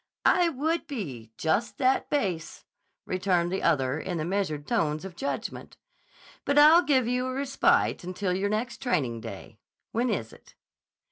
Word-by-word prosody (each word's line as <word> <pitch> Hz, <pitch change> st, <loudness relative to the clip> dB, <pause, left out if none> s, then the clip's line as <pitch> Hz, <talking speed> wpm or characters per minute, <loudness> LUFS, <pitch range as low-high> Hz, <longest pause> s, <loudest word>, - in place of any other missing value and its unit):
_" -, -, -51 dB, 0.2 s
"I 350 Hz, -2 st, +4 dB
would 320 Hz, +3 st, -1 dB
be 135 Hz, -, -6 dB
just 205 Hz, +9 st, 0 dB
that 260 Hz, 0 st, +2 dB
base," 180 Hz, -, -2 dB, 0.4 s
returned 180 Hz, -2 st, 0 dB
the 190 Hz, -, -1 dB
other 135 Hz, -3 st, +1 dB
in 175 Hz, +1 st, -4 dB
the 155 Hz, -, -2 dB
measured 175 Hz, -6 st, -2 dB
tones 155 Hz, -7 st, 0 dB
of 190 Hz, -3 st, -8 dB
judgment. 280 Hz, +10 st, -5 dB, 0.7 s
"But 285 Hz, -, 0 dB
I'll 310 Hz, +4 st, +8 dB
give 265 Hz, -8 st, +2 dB
you 250 Hz, +1 st, 0 dB
a 255 Hz, -, -3 dB
respite 275 Hz, -7 st, +2 dB
until 185 Hz, +1 st, -2 dB
your 195 Hz, +2 st, 0 dB
next 220 Hz, +5 st, -2 dB
training 135 Hz, -, -1 dB
day. -, -, -9 dB, 0.3 s
When 240 Hz, +3 st, 0 dB
is 115 Hz, -, -3 dB
it?" -, -, -19 dB
195 Hz, 160 wpm, -27 LUFS, 160-260 Hz, 0.7 s, I'll